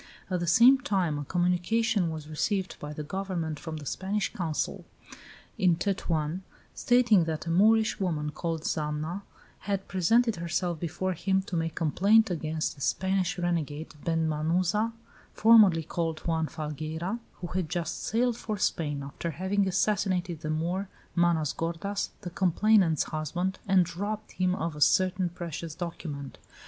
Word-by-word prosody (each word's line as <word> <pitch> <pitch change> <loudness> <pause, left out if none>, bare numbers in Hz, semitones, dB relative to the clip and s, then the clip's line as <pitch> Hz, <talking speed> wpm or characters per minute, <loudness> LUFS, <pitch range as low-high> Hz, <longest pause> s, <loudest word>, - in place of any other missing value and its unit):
At 180 - +1
the 175 - -2
same 240 +10 +7
time 180 - 0
a 145 - -5
communication 180 - +1
was 155 -2 -6
received 185 +5 -1
by 150 - -6
the 150 0 -5
government 170 -3 -3
from 160 -2 -6
the 150 - -8
Spanish 195 +7 -2
Consul 160 -4 -2 0.8
in 180 -4 +4
Tetuan, 170 -3 -1 0.3
stating 240 -8 +4
that 160 0 -3
a 165 - -2
Moorish 215 +5 +4
woman 155 -6 -1
called 165 0 -3
Zama 155 +4 -2 0.5
had 195 -1 -1
presented 225 +4 +2
herself 170 0 -2
before 175 +3 -2
him 190 +2 0
to 190 - -5
make 165 -1 -1
complaint 200 +7 +3
against 160 -2 -2
the 140 - -15
Spanish 190 +3 0
renegade, 165 -3 -2
Ben 165 -1 +1
Manuza, 170 +8 +1 0.4
formerly 210 -7 +6
called 165 0 -3
Juan 160 -1 0
Falgueira, 155 - -4
who 175 - -7
had 180 -4 -1
just 170 0 -3
sailed 235 +1 +1
for 215 -3 -4
Spain, 145 -6 -1
after 140 +4 -5
having 190 +5 0
assassinated 185 -3 0
the 155 - -5
Moor, 175 +5 -1 0.3
Manos 170 -4 +2
gordas, 170 +5 -2
the 180 -4 -6
complainant's 185 -2 +3
husband, 175 +5 -3
and 185 -3 +3
robbed 210 +3 -4
him 185 0 0
of 165 -3 -3
a 150 - -8
certain 185 +3 +3
precious 170 -2 -6
document. 160 -5 -6
175 Hz, 150 wpm, -28 LUFS, 160-195 Hz, 0.8 s, same